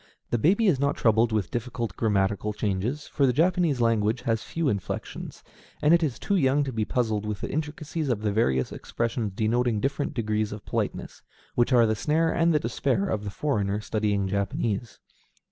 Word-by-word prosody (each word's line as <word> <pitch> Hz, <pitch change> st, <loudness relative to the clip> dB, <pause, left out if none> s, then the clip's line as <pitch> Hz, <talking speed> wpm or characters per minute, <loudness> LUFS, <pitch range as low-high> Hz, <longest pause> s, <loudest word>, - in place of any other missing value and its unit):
The 120 Hz, -, +1 dB
baby 195 Hz, -, +3 dB
is 170 Hz, -10 st, +3 dB
not 140 Hz, +1 st, +1 dB
troubled 115 Hz, 0 st, +3 dB
with 105 Hz, -5 st, -1 dB
difficult 120 Hz, -3 st, -3 dB
grammatical 105 Hz, -1 st, 0 dB
changes, 105 Hz, +8 st, -2 dB
for 140 Hz, -, +1 dB
the -, -, +4 dB
Japanese 165 Hz, 0 st, +2 dB
language 115 Hz, 0 st, +2 dB
has 115 Hz, -2 st, 0 dB
few 165 Hz, -2 st, -2 dB
inflections; 100 Hz, -7 st, -4 dB, 0.4 s
and 150 Hz, +2 st, +4 dB
it 170 Hz, -, +5 dB
is 145 Hz, -7 st, -1 dB
too 200 Hz, -, -1 dB
young 145 Hz, -4 st, +3 dB
to 135 Hz, -2 st, -4 dB
be 110 Hz, -1 st, 0 dB
puzzled 110 Hz, -4 st, 0 dB
with 105 Hz, -1 st, -4 dB
the -, -, -4 dB
intricacies 155 Hz, 0 st, -3 dB
of 110 Hz, -4 st, -1 dB
the 105 Hz, -, +1 dB
various 65 Hz, -, +1 dB
expressions 115 Hz, -3 st, -3 dB
denoting 115 Hz, +1 st, +1 dB
different 140 Hz, +4 st, -2 dB
degrees 110 Hz, -3 st, -1 dB
of 105 Hz, 0 st, -8 dB
politeness, -, -, -3 dB, 0.3 s
which 120 Hz, +2 st, +2 dB
are 120 Hz, -2 st, +6 dB
the 110 Hz, -, +2 dB
snare 160 Hz, +8 st, +1 dB
and 170 Hz, 0 st, +2 dB
the 150 Hz, -, +3 dB
despair 115 Hz, -4 st, 0 dB
of 105 Hz, -1 st, -2 dB
the -, -, -2 dB
foreigner 105 Hz, -4 st, -1 dB
studying 105 Hz, -2 st, 0 dB
Japanese. 100 Hz, +3 st, -2 dB
115 Hz, 185 wpm, -26 LUFS, 105-140 Hz, 0.4 s, are